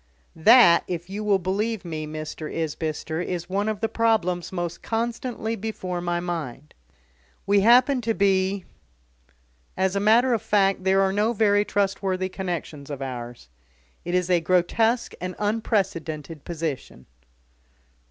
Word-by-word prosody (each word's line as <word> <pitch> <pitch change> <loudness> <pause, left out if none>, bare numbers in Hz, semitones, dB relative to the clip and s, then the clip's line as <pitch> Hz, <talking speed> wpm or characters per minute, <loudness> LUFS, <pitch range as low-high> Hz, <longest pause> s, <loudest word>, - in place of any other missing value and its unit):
"That, 175 0 +7
if 175 +1 -5
you 210 +2 -4
will 205 -2 +3
believe 200 +3 -2
me, 155 -2 -5
Mr. 155 0 -6
Isbister, 160 0 -3
is 175 -1 -4
one 200 +3 -1
of 215 -2 -4
the 225 - +1
problems 210 -7 0
most 175 -2 -4
constantly 230 0 -3
before 185 -5 -4
my 175 0 -1
mind. 150 -5 -5 0.7
We 200 0 +4
happen 250 +5 +5
to 225 -1 -1
be 195 -1 +1 1.1
as 190 0 +1
a - - +2
matter 230 +5 +4
of 225 - 0
fact, 195 -2 +1
there 190 +1 +4
are 190 0 +2
no 210 +3 +1
very 205 -2 +3
trustworthy 195 -2 -1
connexions 170 -6 -5
of 140 -2 -5
ours. 120 - -7 0.6
It 175 +1 -2
is 180 0 0
a 175 - +4
grotesque 205 +8 +1
and 185 0 -4
unprecedented 170 - -2
position." 155 - -5
190 Hz, 140 wpm, -24 LUFS, 170-210 Hz, 1.1 s, That